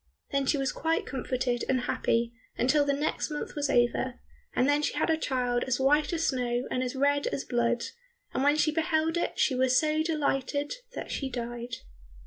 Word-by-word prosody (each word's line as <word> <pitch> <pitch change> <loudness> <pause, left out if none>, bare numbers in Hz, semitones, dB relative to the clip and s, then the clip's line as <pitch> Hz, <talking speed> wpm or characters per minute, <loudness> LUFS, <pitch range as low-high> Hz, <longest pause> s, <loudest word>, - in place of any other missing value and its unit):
Then 275 -1 +1
she 290 - +3
was 270 -1 0
quite 325 0 0
comforted 255 -2 -1
and 260 -2 +2
happy 235 -1 0 0.2
until 290 +4 +3
the 285 - +2
next 295 +3 -1
month 300 -1 -4
was 290 -1 -1
over, 245 +1 +1 0.4
and 255 - +3
then 290 +1 +3
she - - -1
had - - +1
a - - +4
child 250 -5 0
as 260 -1 0
white 295 +5 +3
as 330 -1 0
snow 245 -1 0
and 255 - 0
as 255 +1 -2
red 285 +1 +2
as 270 - -2
blood, 240 0 +1 0.5
and - - 0
when 290 +1 +5
she 310 0 +3
beheld 320 0 +1
it 345 - -1
she - - +3
was 255 0 +3
so 310 +1 +2
delighted 290 -2 0 0.2
that - - -5
she 270 - -2
died. 240 -1 -5
270 Hz, 195 wpm, -29 LUFS, 250-300 Hz, 0.5 s, when